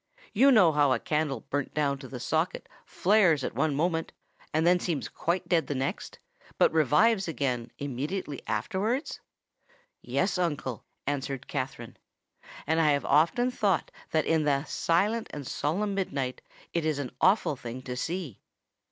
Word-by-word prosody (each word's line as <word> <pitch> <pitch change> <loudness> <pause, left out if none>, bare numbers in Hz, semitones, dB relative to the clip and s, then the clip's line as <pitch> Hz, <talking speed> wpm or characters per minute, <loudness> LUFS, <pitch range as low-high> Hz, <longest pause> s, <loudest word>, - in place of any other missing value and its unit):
You 270 +6 +6
know 190 -10 +6
how 145 -2 +3
a - - 0
candle 150 -6 -1
burnt 145 -1 -3
down 140 -2 +1
to 135 - -9
the 125 -1 -7
socket 160 +7 -1 0.2
flares 180 -7 +3
at - - -3
one 155 -3 0
moment, 165 +2 0 0.4
and 160 +1 +1
then 180 +1 +5
seems 165 -6 -2
quite 175 +2 -2
dead 170 -3 +2
the 145 - -2
next, 135 +1 -3 0.4
but - - +4
revives 190 - +3
again 125 -7 -2
immediately 145 +3 -4
afterwards?" 205 - -1 0.8
"Yes, 185 0 0
uncle," 145 -8 -2 0.2
answered 135 -1 -3
Katherine; 130 -4 -5 0.7
"and 160 +2 +2
I 155 - +4
have 140 - -1
often 170 - +3
thought 205 -7 0 0.2
that 155 -1 +1
in 160 -1 +2
the 140 -2 +1
silent 200 +9 0
and 145 -2 -7
solemn 195 +11 -1
midnight 140 -10 -2 0.3
it 170 - 0
is 155 -2 0
an 140 -4 -4
awful 190 -6 +3
thing 125 0 -7
to 125 -1 -5
see." 160 - -4
155 Hz, 155 wpm, -28 LUFS, 140-180 Hz, 0.8 s, You